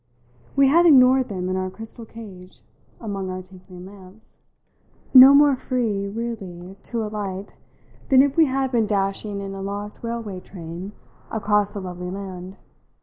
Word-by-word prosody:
We 275 0 +5
had 340 +5 +5
ignored 260 -3 +5
them 185 -3 -4
in 185 - -1
our 185 0 -2
crystal 225 +3 -9
cage, 190 -6 -12 0.4
among 200 -4 -5
our 185 0 -5
tinkling 185 -1 -14
lamps; 195 +2 -13 0.7
no 260 +1 +11
more 285 -1 +5
free 225 -6 -2
really 195 -5 -6
to 230 -2 -3
alight 205 -2 -5 0.6
than 265 0 +7
if 280 -1 -1
we 325 - +5
had 265 -1 -1
been 230 -4 +1
dashing 200 0 -1
in 195 0 -6
a 195 - -7
locked 205 +1 -6
railway 230 -5 -5
train 180 +2 -9 0.4
across 210 -1 0
a - - -3
lovely 180 -1 -6
land. 190 0 -8
205 Hz, 150 wpm, -22 LUFS, 185-235 Hz, 0.7 s, no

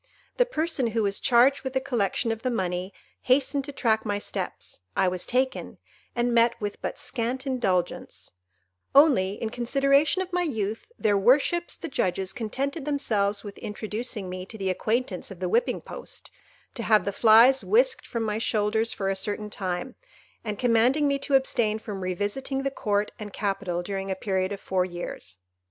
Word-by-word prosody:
The - - +4
person 315 - 0
who 225 - +3
was 200 0 0
charged 255 +3 +4
with 265 -1 -4
the 265 - +2
collection 235 -3 0
of 225 0 -4
the 255 - 0
money, 185 -4 -2 0.3
hastened 270 +1 +2
to 285 - -6
track 220 -5 +1
my 205 -2 -1
steps; 205 - -5 0.2
I 190 - +4
was 180 0 -1
taken, 260 +1 -1 0.4
and 240 0 +1
met 235 0 +3
with 205 -2 -4
but - - -4
scant 255 +2 -2
indulgence; 200 -10 -2 0.6
only, 265 -10 +6
in 220 - -3
consideration 275 +8 +2
of 370 -1 -12
my 360 - +2
youth, 220 - -2
their 205 -2 +2
worships 280 - +3
the 335 - -6
judges 190 - -1
contented 270 +6 -3
themselves 210 -8 0
with 205 -2 -9
introducing 215 0 -4
me 185 0 -5
to 220 - -9
the 190 -2 -1
acquaintance 215 0 -1
of 190 - -10
the 185 - -1
whipping 230 +7 +1
post, - - -7 0.4
to 235 - -4
have 215 -1 +3
the 200 - -1
flies 235 +5 +6
whisked 485 +2 +2
from 230 -1 -2
my 215 0 -1
shoulders 220 0 +1
for 200 -3 -3
a 195 - +1
certain 210 +2 -3
time, 190 +6 -3 0.5
and 210 -2 -4
commanding 245 +5 +3
me 280 0 +1
to 275 0 +1
abstain 240 -5 +2
from 205 -3 -6
revisiting 205 +9 -2
the 275 - -1
Court 210 -5 -1
and 205 -2 -7
Capital 195 -3 -2
during 195 +1 -4
a 190 - 0
period 190 0 -1
of 200 - -4
four 185 -2 0
years. 175 - -5
225 Hz, 175 wpm, -26 LUFS, 200-265 Hz, 0.6 s, only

